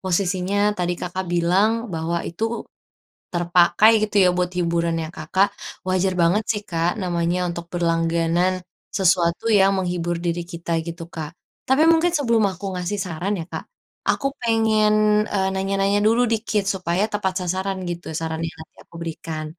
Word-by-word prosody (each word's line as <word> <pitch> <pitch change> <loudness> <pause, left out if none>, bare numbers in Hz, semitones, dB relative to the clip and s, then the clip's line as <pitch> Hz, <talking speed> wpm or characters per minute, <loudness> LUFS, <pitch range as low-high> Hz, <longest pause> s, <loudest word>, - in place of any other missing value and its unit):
posisinya 190 +2 +1
tadi 175 0 0
Kakak 185 +1 -3
bilang 180 +5 +3 0.2
bahwa 165 +1 -2
itu 225 +7 -3 0.7
terpakai 175 +5 +4 0.2
gitu - - -13
ya - - +6
buat 180 0 0
hiburannya 170 -2 0
Kakak. 195 +2 +1 0.4
Wajar 185 0 +1
banget 180 +6 +3
sih 210 -2 0
Kak, 170 +1 -1
namanya 180 -1 0
untuk 170 0 -5
berlangganan 170 +1 +1 0.3
sesuatu 180 -1 +2
yang 195 -1 +5
menghibur 175 -2 -1
diri 170 0 -2
kita 170 -1 -6
gitu 170 0 -7
Kak. 160 -3 -6 0.4
Tapi 290 +4 +5
mungkin 330 +1 +4
sebelum 235 -10 +2
aku 190 +1 -6
ngasih 180 +3 -3
saran 185 +2 -2
ya 165 - -5
Kak, - - -6 0.5
aku 275 - +2
pengen, 220 -2 +3 0.4
eee, 190 -2 0
nanya-nanya 195 +1 +1
dulu 225 +4 +3
dikit 220 -2 0
supaya 190 0 0
tepat 190 -3 -1
sasaran 190 +2 -2
gitu 175 0 -5
saran 160 0 -3
yang 165 -3 -4
nanti - - -31
aku - - -17
berikan. 160 -1 -5
180 Hz, 150 wpm, -22 LUFS, 170-200 Hz, 0.7 s, ya